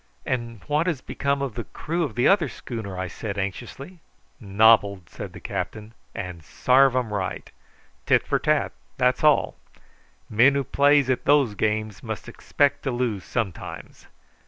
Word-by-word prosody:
"And 120 -3 -3
what 150 +4 +1
has 165 -7 0
become 140 +1 -2
of 135 -5 -3
the 120 0 -5
crew 170 +3 -4
of 145 -9 -2
the 120 - +3
other 180 -8 +3
schooner?" 110 -8 -7
I 95 0 -3
said 100 +2 -6
anxiously. 135 - -6 0.4
"Nobbled," 100 -3 +3
said - - -8
the - - -10
captain; 100 +4 -5 0.2
"and 90 -4 -6
sarve 130 - +3
'em 120 -4 -1
right. 95 -3 -4 0.6
Tit - - +3
for - - 0
tat; - - +1 0.3
that's 125 +1 +1
all. 150 -2 +3 0.7
Men 125 +6 +4
who 140 - +1
plays 145 +1 +3
at 130 - -2
those 140 -6 +4
games 110 0 -2
must - - -6
expect 145 0 0
to 135 - -2
lose 120 -6 -2
sometimes. 105 -8 -5
120 Hz, 160 wpm, -24 LUFS, 105-140 Hz, 0.7 s, Men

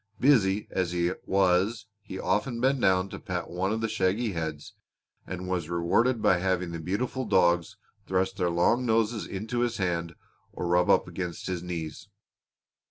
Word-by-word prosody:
Busy 105 -7 +3
as 90 -2 -1
he 85 0 +1 0.2
was 95 +4 +2 0.2
he 95 - -8
often 105 +6 0
bent 135 +1 +2
down 95 0 +3
to - - -7
pat 90 -4 -4
one 95 +3 -1
of 110 +1 -1
the 115 - 0
shaggy 110 +1 0
heads, 80 -4 -5 0.5
and 90 0 -5
was 90 -3 -2
rewarded 105 +8 +1
by 90 - +4
having 90 -1 0
the 85 - -5
beautiful 105 +10 -2
dogs 85 -6 +2 0.3
thrust 95 +1 0
their 90 -3 +1
long 90 +9 +2
noses 115 -1 +1
into 110 +5 -3
his 120 -1 0
hand 85 -3 -2 0.4
or - - -4
rub 90 +1 +2
up - - +4
against 90 -3 -5
his 90 -2 -3
knees. 85 -3 -6
95 Hz, 165 wpm, -28 LUFS, 90-110 Hz, 0.5 s, by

